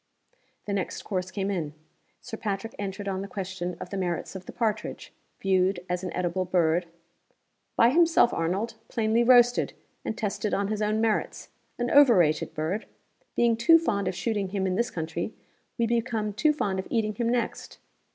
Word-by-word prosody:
The 205 Hz, -, -3 dB
next 195 Hz, -2 st, -3 dB
course 185 Hz, -2 st, -3 dB
came 195 Hz, +1 st, -2 dB
in. 155 Hz, -6 st, -3 dB, 0.5 s
Sir 235 Hz, -, -7 dB
Patrick 215 Hz, +1 st, -4 dB
entered 200 Hz, 0 st, -4 dB
on 190 Hz, -1 st, -2 dB
the 200 Hz, -, -5 dB
question 190 Hz, -2 st, -5 dB
of -, -, -8 dB
the 200 Hz, -, -3 dB
merits 180 Hz, 0 st, -2 dB
of 185 Hz, -1 st, -8 dB
the -, -, -6 dB
partridge, 215 Hz, -3 st, -3 dB, 0.3 s
viewed 185 Hz, -1 st, +1 dB
as 180 Hz, 0 st, -2 dB
an 185 Hz, -, -3 dB
eatable 180 Hz, +1 st, 0 dB
bird, 175 Hz, -1 st, +1 dB, 0.9 s
"By 235 Hz, -, +5 dB
himself, 330 Hz, -5 st, +4 dB
Arnold 190 Hz, +8 st, -1 dB
plainly 225 Hz, 0 st, +1 dB
roasted, 245 Hz, 0 st, +5 dB, 0.3 s
and 220 Hz, -, -3 dB
tested 210 Hz, -1 st, -1 dB
on 200 Hz, 0 st, -1 dB
his 215 Hz, 0 st, -2 dB
own 215 Hz, +1 st, +1 dB
merits 225 Hz, -2 st, -1 dB, 0.3 s
an 240 Hz, 0 st, -1 dB
overrated 210 Hz, -, +5 dB
bird. 165 Hz, +8 st, -2 dB, 0.5 s
Being 235 Hz, -1 st, +3 dB
too 315 Hz, +9 st, +6 dB
fond 200 Hz, -, -1 dB
of 185 Hz, -, -1 dB
shooting 205 Hz, +1 st, -1 dB
him 190 Hz, 0 st, -2 dB
in 185 Hz, -, 0 dB
this 235 Hz, +5 st, 0 dB
country, 165 Hz, +5 st, -4 dB, 0.4 s
we 235 Hz, -, +2 dB
become 230 Hz, -2 st, -1 dB
too 305 Hz, +9 st, +3 dB
fond 200 Hz, -11 st, -1 dB
of 190 Hz, -, -5 dB
eating 215 Hz, -2 st, 0 dB
him 230 Hz, +2 st, -1 dB
next. 240 Hz, -1 st, -2 dB
200 Hz, 175 wpm, -27 LUFS, 185-230 Hz, 0.9 s, too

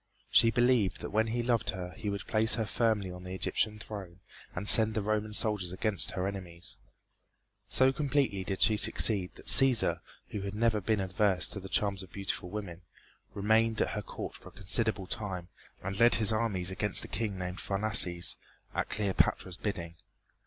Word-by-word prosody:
She 115 Hz, -, +5 dB
believed 120 Hz, -3 st, +1 dB
that -, -, -6 dB
when 110 Hz, +2 st, +1 dB
he 120 Hz, +1 st, -2 dB
loved 120 Hz, -2 st, 0 dB
her 90 Hz, -1 st, -5 dB
he 105 Hz, -3 st, -5 dB
would 100 Hz, 0 st, -5 dB
place 110 Hz, 0 st, +2 dB
her 110 Hz, -1 st, -2 dB
firmly 105 Hz, -4 st, -1 dB
on 90 Hz, 0 st, -10 dB
the 90 Hz, 0 st, -7 dB
Egyptian 105 Hz, +4 st, -1 dB
throne 95 Hz, -5 st, -9 dB, 0.4 s
and 95 Hz, +4 st, -4 dB
send 110 Hz, 0 st, +6 dB
the 110 Hz, -, 0 dB
Roman 105 Hz, 0 st, -2 dB
soldiers 105 Hz, -6 st, -1 dB
against 95 Hz, -, -1 dB
her 90 Hz, -, -2 dB
enemies. 90 Hz, -3 st, -5 dB, 0.9 s
So 130 Hz, 0 st, +3 dB
completely 135 Hz, -9 st, -1 dB
did 95 Hz, 0 st, -1 dB
she 110 Hz, -2 st, +3 dB
succeed 105 Hz, -2 st, +3 dB
that -, -, -15 dB
Cæsar, 130 Hz, -4 st, +6 dB, 0.3 s
who 105 Hz, -, -5 dB
never 110 Hz, +2 st, 0 dB
had 100 Hz, -, -7 dB
been 110 Hz, -2 st, +2 dB
averse 95 Hz, 0 st, 0 dB
to 100 Hz, -, -5 dB
the 95 Hz, 0 st, -10 dB
charms 100 Hz, +3 st, -1 dB
of 95 Hz, -3 st, -12 dB
beautiful 100 Hz, -2 st, -5 dB
women, 95 Hz, -4 st, -7 dB, 0.5 s
remained 110 Hz, +2 st, +1 dB
at -, -, +1 dB
her 105 Hz, -, -4 dB
court -, -, -8 dB
for -, -, -12 dB
a -, -, -22 dB
considerable 100 Hz, +1 st, -1 dB
time 90 Hz, -3 st, -5 dB, 0.3 s
and 95 Hz, +2 st, -4 dB
led 120 Hz, +1 st, +6 dB
his 110 Hz, -1 st, +4 dB
armies 100 Hz, -5 st, -2 dB
against 105 Hz, +2 st, +3 dB
a -, -, -9 dB
king 105 Hz, -4 st, -3 dB
named 90 Hz, 0 st, -5 dB
Pharnaces 100 Hz, -4 st, +2 dB, 0.4 s
at -, -, -2 dB
Cleopatra's 95 Hz, -3 st, 0 dB
bidding. 85 Hz, -5 st, -5 dB
105 Hz, 180 wpm, -30 LUFS, 95-110 Hz, 0.9 s, send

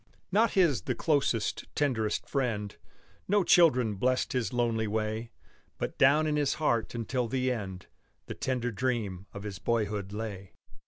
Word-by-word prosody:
Not 220 Hz, +3 st, +3 dB
his 165 Hz, -, +3 dB
the -, -, -2 dB
closest, 140 Hz, -8 st, 0 dB
tenderest 115 Hz, -7 st, 0 dB
friend 115 Hz, -7 st, -2 dB, 0.5 s
No 205 Hz, 0 st, +3 dB
children 130 Hz, -, +4 dB
blessed 130 Hz, +4 st, +1 dB
his 120 Hz, -6 st, -1 dB
lonely 115 Hz, -2 st, 0 dB
way; 110 Hz, +2 st, -2 dB, 0.5 s
But -, -, -4 dB
down 145 Hz, +3 st, +5 dB
in 150 Hz, -1 st, 0 dB
his 145 Hz, -2 st, +1 dB
heart 120 Hz, -7 st, 0 dB
until 120 Hz, +1 st, -1 dB
the 130 Hz, +2 st, 0 dB
end 95 Hz, -6 st, -5 dB, 0.4 s
The -, -, -6 dB
tender 125 Hz, -2 st, -2 dB
dream 105 Hz, -5 st, -2 dB
of 100 Hz, -, -8 dB
his 100 Hz, -3 st, -6 dB
boyhood 105 Hz, -2 st, -1 dB
lay. 105 Hz, -3 st, -6 dB
120 Hz, 150 wpm, -29 LUFS, 105-135 Hz, 0.5 s, down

